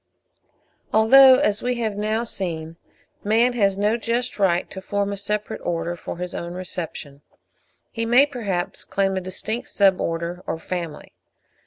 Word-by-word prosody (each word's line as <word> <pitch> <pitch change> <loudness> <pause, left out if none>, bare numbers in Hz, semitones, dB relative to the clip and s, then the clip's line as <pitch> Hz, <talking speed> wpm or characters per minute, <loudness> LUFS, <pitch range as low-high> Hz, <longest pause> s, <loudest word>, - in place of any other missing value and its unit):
Although, 260 +5 +8
as 210 -7 +1
we 250 0 -1
have 225 -3 -2
now 215 +2 -1
seen, 165 -7 -4 0.5
man 230 +4 +3
has 200 -5 +1
no 210 +3 +1
just 240 0 -2
right 180 -3 +2
to 190 - -7
form 200 +1 -2
a - - -3
separate 210 +1 -3
Order 170 0 -2
for 170 - -7
his 180 0 -5
own 170 +1 -5
reception, 165 -6 -6 0.7
he 230 - -3
may 245 +4 +6
perhaps 205 -11 -4
claim 195 -1 0
a 190 - -1
distinct 215 +6 -4
Sub 195 -2 +3
order 170 +2 -3
or - - -2
Family. 170 -1 -6
200 Hz, 155 wpm, -23 LUFS, 175-225 Hz, 0.7 s, Although